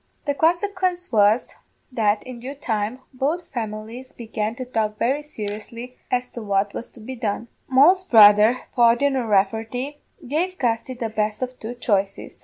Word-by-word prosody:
The 285 - +1
quensequence 360 +3 0
was, 215 +1 +3 0.4
that 215 -3 +1
in 255 -2 -9
due 265 +4 -7
time 225 -1 -2
both 300 +7 -1
families 225 +3 -6
began 220 -1 -4
to 255 0 -6
talk 215 -3 -1
very 270 +7 +1
seriously 230 -1 -7
as 250 0 0
to 235 - -8
what 200 -1 0
was 235 - -5
to - - -12
be 260 +4 -7
done. 225 -1 -3 0.2
Moll's 315 +9 +5
brother, 215 - +7
Pawdien 240 +4 +4
O'Rafferty, 225 +5 0 0.3
gave 350 +7 -1
Gusty 240 +1 -1
the 235 -2 -3
best 215 +2 -1
of 255 0 -6
two 230 +3 -6
choices. 200 -4 -1
235 Hz, 155 wpm, -23 LUFS, 215-265 Hz, 0.4 s, brother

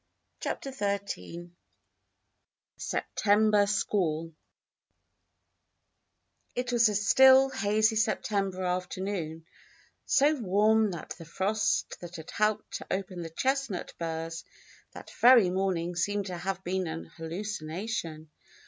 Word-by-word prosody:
CHAPTER 275 - -4
XIII 200 - -4 1.2
A - - -38
SEPTEMBER 210 0 +2
SQUALL 165 -6 -1 2.2
It 250 0 -2
was 235 -2 +4
a 210 - -2
still, 265 +6 +6
hazy 215 -1 +1
September 200 -3 0
afternoon, 180 -2 -3 0.6
so 285 +3 +4
warm 215 -2 +2
that 170 -4 -7
the 165 - -9
frost 200 +6 -1
that 175 0 -9
had 160 -1 -9
helped 215 0 0
to - - -11
open 190 -2 -3
the 165 - -6
chestnut 265 - -2
burrs 165 0 -4 0.5
that - - -11
very 235 -7 +7
morning 180 -2 -1
seemed 205 +3 -1
to 180 -2 -5
have 190 +2 -4
been 185 0 -1
an 160 +1 -5
hallucination. 165 -1 -5
195 Hz, 110 wpm, -29 LUFS, 170-215 Hz, 2.2 s, very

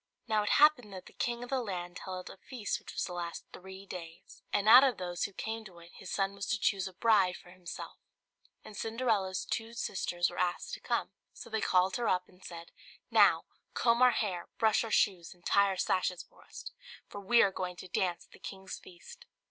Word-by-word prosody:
Now 215 -2 +2
it 210 - -1
happened 285 -8 +5
that 185 -1 -8
the - - -15
king 240 0 -2
of 245 - -9
the 265 -1 +1
land 180 -5 -5
held 185 -1 -6
a - - -13
feast 230 0 -4
which - - -10
was - - -2
to 180 - -6
last 175 -1 -5
three 190 +1 -10
days, 165 -4 -10
and 205 - +1
out 250 +4 +10
of 260 -5 +2
those 175 -1 -2
who 200 - -5
came 220 +3 -4
to 185 -4 -13
it 170 0 -14
his 190 - -10
son 195 0 0
was 200 -1 -5
to 220 - 0
choose 195 -2 +1
a 190 - -9
bride 195 -4 +4
for 175 - -16
himself; 180 -2 -8 0.6
and 210 - -11
Cinderella's 220 -4 0
two 225 0 -3
sisters 175 -5 -1
were 175 - -7
asked 175 -1 -1
to - - -4
come. - - -1 0.2
So - - -11
they 220 - 0
called 185 +1 +3
her 240 -2 0
up 180 0 +1
and 185 0 -21
said, 170 -1 -9 0.4
"Now, - - +5 0.3
comb 235 0 +3
our 255 - +8
hair, 190 -7 -1
brush 220 -1 +3
our 225 - -5
shoes, 185 -5 +1
and 175 - -27
tie 200 0 +4
our 190 -1 -2
sashes 180 -1 0
for - - -22
us, - - -9 0.4
for 205 - -8
we 235 +5 +5
are 195 - +3
going 180 -1 -4
to 180 - -9
dance 175 -1 -1
at - - -33
the - - -16
king's 190 -1 -7
feast." 175 -1 -14
190 Hz, 225 wpm, -32 LUFS, 180-220 Hz, 0.6 s, out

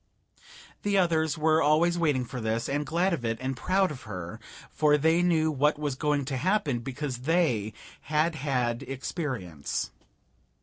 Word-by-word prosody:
The 205 -1 +1
others 160 -3 +2
were 155 +1 +3
always 160 +4 +3
waiting 150 -7 +1
for 125 +1 -6
this, 110 +1 -1
and 145 +1 -1
glad 175 +5 +1
of 145 -8 -3
it 115 -1 -1
and 130 +1 -2
proud 185 +7 +1
of 135 -3 -8
her, 90 -7 -7 0.3
for 150 -1 +3
they 160 +3 +3
knew 160 -3 +2
what 150 +1 +2
was 145 -2 -2
going 145 +1 0
to 135 -1 -2
happen, 175 - +1
because 135 +1 -4
they 125 - +1 0.3
had 155 +3 +1
had 125 -5 -1
experience. 130 - -4
150 Hz, 160 wpm, -28 LUFS, 125-160 Hz, 0.3 s, were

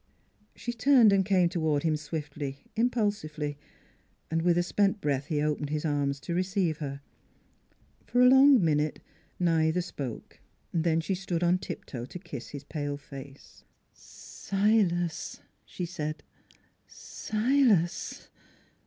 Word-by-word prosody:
She 240 - -4
turned 240 -3 +5
and 195 -1 +4
came 185 -2 +3
toward 160 -4 0
him 160 -2 +2
swiftly, 150 -2 -5
im 235 +2 +3
pulsively. 155 -11 -2 0.8
With 170 +1 +2
a 175 - +3
spent 200 +3 +1
breath 140 -3 -1
he 150 -2 0
opened 150 -1 -1
his 150 +1 -2
arms 145 -2 0
to 170 - -4
receive 180 -2 0
her. 140 -2 -5 1.1
For 245 - +1
a 250 - +8
long 265 -5 +7
minute 150 -1 +1 0.4
neither 165 -1 +2
spoke; 140 -9 -7 0.3
then 165 -1 +2
she 190 - -2
stood 180 -2 -2
on 175 +1 +3
tiptoe 120 -8 -6
to 135 - -8
kiss 140 -7 -8
his 145 -1 -8
pale 145 -1 -4
face. 140 -1 -12
" - - -44
Silas," 195 -5 -1 0.3
she 180 - -5
said. 155 -2 -5 0.6
"Silas!" 220 -6 0
165 Hz, 130 wpm, -28 LUFS, 150-195 Hz, 1.1 s, a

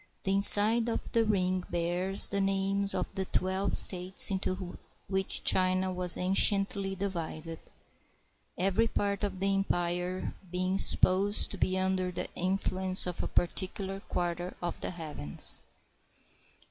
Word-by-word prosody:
The 195 - 0
inside 210 +4 +7
of 230 - -5
the 230 - +1
ring 185 -3 -1
bears 175 +3 -1
the 200 0 -2
names 195 +1 -2
of - - -2
the 190 -1 -4
twelve 190 +2 -1
states 185 +2 +5
into 185 -1 -5 0.3
which 190 0 -2
China 185 0 +2
was 180 -1 -2
anciently 195 +1 +3
divided; 165 -4 -6 1.0
every 195 +5 0
part 200 -2 -3
of 195 -2 -4
the 195 +1 0
empire 180 -1 -3 0.2
being 185 +2 -2
supposed 195 +3 +3
to 200 - -8
be 185 0 -1
under 185 -1 -2
the 180 - -5
in 185 +2 -2
fluence 185 -1 0
of 180 -1 -5
a - - -4
particular 190 +2 -3
quarter 175 -1 -5
of 175 -1 -6
the - - -3
heavens. 155 - -1
190 Hz, 135 wpm, -28 LUFS, 180-195 Hz, 1.0 s, inside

